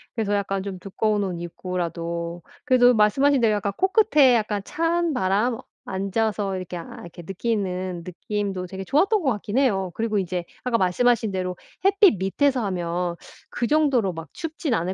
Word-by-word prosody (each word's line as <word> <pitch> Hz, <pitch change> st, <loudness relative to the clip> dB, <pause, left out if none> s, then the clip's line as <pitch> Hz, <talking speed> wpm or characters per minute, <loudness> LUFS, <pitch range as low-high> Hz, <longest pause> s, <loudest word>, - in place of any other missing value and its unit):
그래서 210 Hz, -3 st, -1 dB
약간 195 Hz, -1 st, -1 dB
좀 190 Hz, -2 st, -6 dB
두꺼운 205 Hz, +2 st, 0 dB
옷 185 Hz, -2 st, -2 dB
입고라도 170 Hz, -1 st, -4 dB, 0.2 s
그래도 250 Hz, -2 st, +5 dB
말씀하신 265 Hz, +6 st, +3 dB
대로 215 Hz, -2 st, +3 dB
약간 200 Hz, 0 st, -1 dB
코끝에 380 Hz, -, +4 dB
약간 210 Hz, -3 st, -1 dB
찬바람 255 Hz, -, 0 dB, 0.3 s
앉아서 195 Hz, +1 st, -1 dB
이렇게 185 Hz, -1 st, -5 dB
아 165 Hz, -, -9 dB
이렇게 175 Hz, 0 st, -11 dB
느끼는 185 Hz, -3 st, -2 dB
느낌도 195 Hz, +1 st, -3 dB
되게 190 Hz, +1 st, -6 dB
좋았던 380 Hz, -, +2 dB
것 270 Hz, -6 st, +2 dB
같긴 210 Hz, +1 st, -3 dB
해요. 195 Hz, -9 st, +2 dB
그리고 220 Hz, -2 st, -1 dB
이제 180 Hz, -2 st, -2 dB, 0.2 s
아까 250 Hz, -2 st, +1 dB
말씀하신 220 Hz, +3 st, +2 dB
대로 185 Hz, -1 st, -2 dB, 0.3 s
햇빛 395 Hz, -, +5 dB
밑에서 250 Hz, +7 st, +1 dB
하면 175 Hz, -1 st, -2 dB, 0.3 s
그 240 Hz, -, -2 dB
정도로 270 Hz, -, +2 dB
막 165 Hz, -2 st, -8 dB
춥진 310 Hz, -3 st, -3 dB
않을 180 Hz, -2 st, 0 dB
205 Hz, 355 characters per minute, -24 LUFS, 185-250 Hz, 0.3 s, 그래도